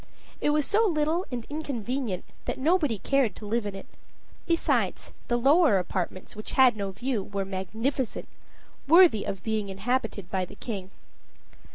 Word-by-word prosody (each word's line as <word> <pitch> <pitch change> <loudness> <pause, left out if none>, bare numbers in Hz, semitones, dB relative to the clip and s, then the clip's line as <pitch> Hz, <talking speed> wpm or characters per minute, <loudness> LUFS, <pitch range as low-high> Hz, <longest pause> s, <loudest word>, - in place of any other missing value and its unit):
It - - +2
was 295 -1 +2
so 430 +3 +3
little 320 +1 0
and 240 -2 -4
inconvenient 255 - -3 0.2
that - - -2
nobody 295 - +2
cared 250 0 +1
to 215 - -9
live 220 +1 -1
in 200 - -5
it. 195 - -8 0.6
Besides, 335 -1 0
the 240 - +1
lower 275 - +5
apartments, 185 +1 -3
which 215 - -6
had 255 -3 +6
no 200 -2 -3
view, 220 +4 -2
were 195 0 -4
magnificent 220 +7 -3 0.6
worthy 335 - +6
of 195 - -4
being 215 -2 -1
inhabited 205 -1 -2
by 190 -1 0
the - - -13
king. 195 -6 -6
230 Hz, 155 wpm, -27 LUFS, 200-285 Hz, 0.6 s, had